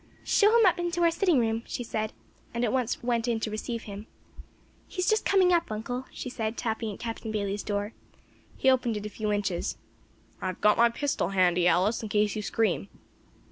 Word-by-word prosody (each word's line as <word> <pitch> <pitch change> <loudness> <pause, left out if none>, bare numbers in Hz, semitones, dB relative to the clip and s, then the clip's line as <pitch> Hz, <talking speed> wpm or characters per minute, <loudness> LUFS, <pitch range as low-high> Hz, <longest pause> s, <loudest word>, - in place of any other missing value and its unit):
"Show 415 - +5
him 455 - +6
up 355 -1 +4
into 345 0 0
our 335 - +5
sitting 350 -2 +2
room," 225 -1 +1
she 245 - -4
said, 220 -1 -3 0.4
and 235 - 0
at 215 - -1
once 250 -3 -1
went 235 -1 0
in 230 -2 +1
to 215 - -2
receive 230 +2 -4
him. 205 +1 -8 0.8
"He's 365 -2 -2
just 435 -1 +2
coming 370 -2 +4
up, 340 -7 +1
uncle," 245 +4 -4
she - - -6
said, 225 -2 -3
tapping 220 -1 -2
at - - -16
Captain 225 -1 -5
Bayley's 200 -1 -2
door. 205 +1 -3 0.6
He - - -1
opened 250 -4 +3
it 210 - -6
a - - -3
few 210 0 -3
inches. 200 -4 -1 0.6
"I 190 - -2
have 185 - -4
got 210 0 +5
my 235 0 +6
pistol 280 -5 -1
handy, 180 -2 +3
Alice, 195 +6 +2
in 220 - -5
case 210 0 +1
you 215 - -2
scream." 200 - 0
225 Hz, 205 wpm, -28 LUFS, 210-255 Hz, 0.8 s, him